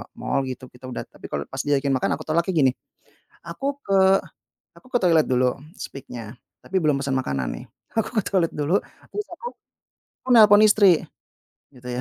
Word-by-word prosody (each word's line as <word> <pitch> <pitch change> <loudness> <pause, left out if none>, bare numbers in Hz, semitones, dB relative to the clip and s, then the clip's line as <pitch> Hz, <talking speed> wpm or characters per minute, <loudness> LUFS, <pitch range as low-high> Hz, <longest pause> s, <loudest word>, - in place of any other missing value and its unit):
mall 135 - -1
gitu, 130 0 -7
kita 125 +1 -12
udah - - -4
tapi - - -12
kalau 70 - -2
pas 135 - -7
diajakin 140 -1 +1
makan, 130 - 0
aku - - -7
tolaknya 170 +4 +1
gini, 130 - +3 0.8
"aku 270 - -6 0.2
ke 195 - 0 0.8
aku - - -18
ke 245 - +3
toilet 165 -4 +4
dulu 125 0 +2 0.2
speak-nya, 120 -4 -8 0.3
tapi 190 - -4
belum 150 -3 +1
pesen 135 -1 -1
makanan 70 - -2
nih, - - -10 0.3
aku 225 - +1
ke - - -8
toilet 180 -4 +1
dulu 150 +5 +1 0.4
terus 420 0 -4
aku 480 - -9 0.8
aku 260 - -12
nelpon 210 -2 +8
istri 200 -5 +5 0.7
gitu 125 -1 -14
145 Hz, 170 wpm, -23 LUFS, 130-195 Hz, 0.8 s, nelpon